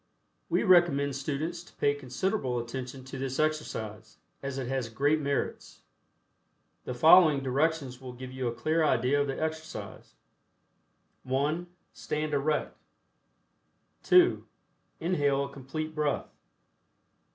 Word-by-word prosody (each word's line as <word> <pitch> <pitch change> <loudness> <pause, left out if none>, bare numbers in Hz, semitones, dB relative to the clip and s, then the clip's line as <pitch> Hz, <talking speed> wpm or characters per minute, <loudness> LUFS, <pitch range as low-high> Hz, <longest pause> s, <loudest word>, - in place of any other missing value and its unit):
We - - +2
recommend 170 -8 +4
students 155 +5 -3
to - - -19
pay 145 - +2
considerable 135 - -2
attention 125 +2 -5
to 130 0 -8
this 135 0 -3
exercise, 110 -9 -2 0.2
as 135 -1 -4
it 130 -2 -3
has 130 -3 -2
great 145 +7 +2
merits. 140 -1 -3 1.0
The 125 - -4
following 155 +1 +7
directions 135 -1 0
will 130 -1 -8
give 130 +1 -8
you 130 -1 -3
a - - 0
clear 155 +7 0
idea 140 0 +2
of 145 - 0
the 135 - -3
exercise: 160 0 -5 1.1
(1) 145 +7 -1 0.3
Stand 150 0 -3
erect. 150 +2 0 1.3
(2) 360 0 +5 0.6
Inhale 145 -5 +1
a - - -8
Complete 155 +4 -5
Breath. 150 -2 -1
140 Hz, 120 wpm, -29 LUFS, 130-155 Hz, 1.3 s, following